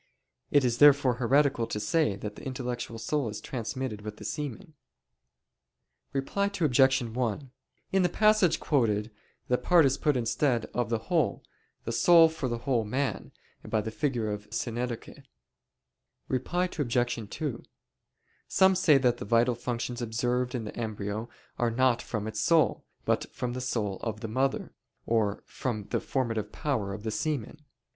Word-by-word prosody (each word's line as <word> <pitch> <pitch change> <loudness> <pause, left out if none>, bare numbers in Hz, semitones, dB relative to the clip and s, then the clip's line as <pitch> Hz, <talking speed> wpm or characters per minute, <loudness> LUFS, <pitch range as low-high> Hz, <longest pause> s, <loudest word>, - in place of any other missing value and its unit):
It 145 -3 +4
is 120 -1 0
therefore 140 -4 +6
heretical 135 -1 +3
to 105 - -3
say 105 +2 +1
that 105 +1 -6
the - - -11
intellectual 125 -3 -4
soul 120 +3 -1
is 105 - -6
transmitted 125 -2 -4
with 105 0 -7
the - - -10
semen. 150 - -5 1.4
Reply 140 +9 0
Obj. 135 -4 +4
1: 120 +2 -3 0.4
In 190 - +3
the 180 - +3
passage 215 -3 +3
quoted, 110 -6 +1 0.4
the 125 - +2
part 175 -4 +5
is 135 -1 +1
put 150 -4 +2
instead 120 +1 +1
of 120 -3 -1
the 115 - +1
whole, 160 +4 0 0.4
the - - -3
soul 165 -2 +6
for 160 -4 -4
the 120 - -2
whole 120 -1 0
man, 130 +6 -2 0.3
by 110 - 0
the 110 +1 -3
figure 120 -5 -1
of 105 0 -6
synecdoche. 120 +2 -4 1.1
Reply 135 +8 0 0.2
Obj. 120 -4 0
2: 140 -3 -4 0.8
Some 190 0 +5
say 170 -6 +5
that 125 -3 +2
the - - -6
vital 115 +3 +3
functions 120 +1 -4
observed 125 +2 -1
in 120 - -2
the 105 - -7
embryo 110 0 -4 0.3
are 120 - +2
not 120 0 +2
from 105 -3 -4
its 110 -1 -4
soul, 160 +7 +3 0.2
but - - 0
from 125 -1 -3
the 130 - -4
soul 105 -6 -2
of 110 -2 -4
the 110 - -3
mother; 130 +5 -1 0.3
or 110 -3 0
from 110 -5 -4
the - - +1
formative 115 -5 -2
power 120 -10 -2
of 100 +1 -6
the 110 - -2
semen. 145 +5 -3
120 Hz, 160 wpm, -28 LUFS, 110-140 Hz, 1.4 s, therefore